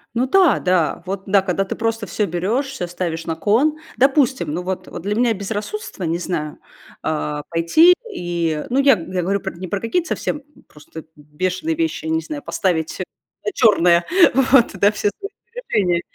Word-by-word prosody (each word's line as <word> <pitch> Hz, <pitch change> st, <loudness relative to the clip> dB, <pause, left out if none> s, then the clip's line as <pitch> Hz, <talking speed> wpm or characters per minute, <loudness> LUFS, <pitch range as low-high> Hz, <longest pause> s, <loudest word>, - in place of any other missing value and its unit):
Ну 255 Hz, +2 st, +1 dB
да, 360 Hz, -, +4 dB
да, 175 Hz, -3 st, +1 dB
вот, 195 Hz, +1 st, -4 dB
да, 195 Hz, 0 st, +4 dB
когда 190 Hz, 0 st, -1 dB
ты 190 Hz, -, -5 dB
просто 225 Hz, -1 st, -2 dB
всё 205 Hz, +4 st, -1 dB
берешь, 200 Hz, -, -1 dB
всё 260 Hz, -10 st, -5 dB
ставишь 170 Hz, -2 st, -4 dB
на 165 Hz, -, -2 dB
кон. 275 Hz, -, +2 dB, 0.2 s
Допустим, 270 Hz, -, +2 dB
ну 180 Hz, +2 st, -3 dB
вот 185 Hz, 0 st, -4 dB
вот 175 Hz, -, -8 dB
для 205 Hz, +1 st, -1 dB
меня 235 Hz, -1 st, +2 dB
безрассудство, 210 Hz, -, -5 dB
не 165 Hz, +1 st, 0 dB
знаю, 155 Hz, -4 st, -4 dB, 0.5 s
а, 150 Hz, -1 st, -2 dB
пойти 170 Hz, -, +5 dB, 0.2 s
и, 170 Hz, -3 st, -2 dB
ну, 260 Hz, +3 st, +1 dB
я 275 Hz, -3 st, +6 dB
г 185 Hz, +1 st, -9 dB
я 180 Hz, -, 0 dB
говорю 195 Hz, +3 st, 0 dB
пр 190 Hz, -2 st, -5 dB
не 185 Hz, 0 st, -6 dB
про 200 Hz, +2 st, -2 dB
какие-то 325 Hz, -, -1 dB
совсем 290 Hz, -, -3 dB, 0.2 s
просто 155 Hz, +1 st, -12 dB
бешеные 185 Hz, -, -3 dB
вещи, 325 Hz, 0 st, -2 dB
я 320 Hz, -, -2 dB
не 320 Hz, 0 st, +1 dB
знаю, 300 Hz, -3 st, -6 dB
поставить 165 Hz, -9 st, -1 dB
всё -, -, -5 dB, 0.4 s
на 420 Hz, -, 0 dB
черное, 175 Hz, -6 st, +4 dB, 0.3 s
вот, 265 Hz, -1 st, +4 dB
да, 200 Hz, +2 st, +4 dB
все 210 Hz, -1 st, 0 dB
свои 400 Hz, -, -6 dB, 0.2 s
сбережения. 195 Hz, -, 0 dB
195 Hz, 190 wpm, -20 LUFS, 175-265 Hz, 0.5 s, я